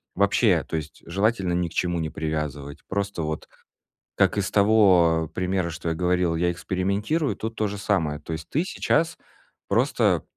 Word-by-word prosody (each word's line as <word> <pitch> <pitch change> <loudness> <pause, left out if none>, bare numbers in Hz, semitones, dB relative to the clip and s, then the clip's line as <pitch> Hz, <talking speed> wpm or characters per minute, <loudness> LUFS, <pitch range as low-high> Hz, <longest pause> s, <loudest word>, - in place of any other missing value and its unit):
Вообще, - - +3
то - - -5
есть 80 -1 -6
желательно 100 0 0
ни 90 0 0
к - - -11
чему 85 -1 0
не 80 -1 -2
привязывать. 75 -3 -4
Просто 100 -2 -2
вот, 75 0 -4 0.7
как - - +2
из 100 - 0
того 95 -7 +4
примера, 90 -1 -1
что 85 0 -4
я 80 - -1
говорил, 90 -1 +1
я 85 +1 +1
экспериментирую, 100 - -1
тут 110 +1 -5
то 110 - 0
же 100 0 -5
самое. 85 -7 0
То 80 +2 -6
есть 80 0 -7
ты 155 - +1
сейчас 170 -2 0 0.5
просто - - +2
90 Hz, 170 wpm, -25 LUFS, 80-100 Hz, 0.7 s, того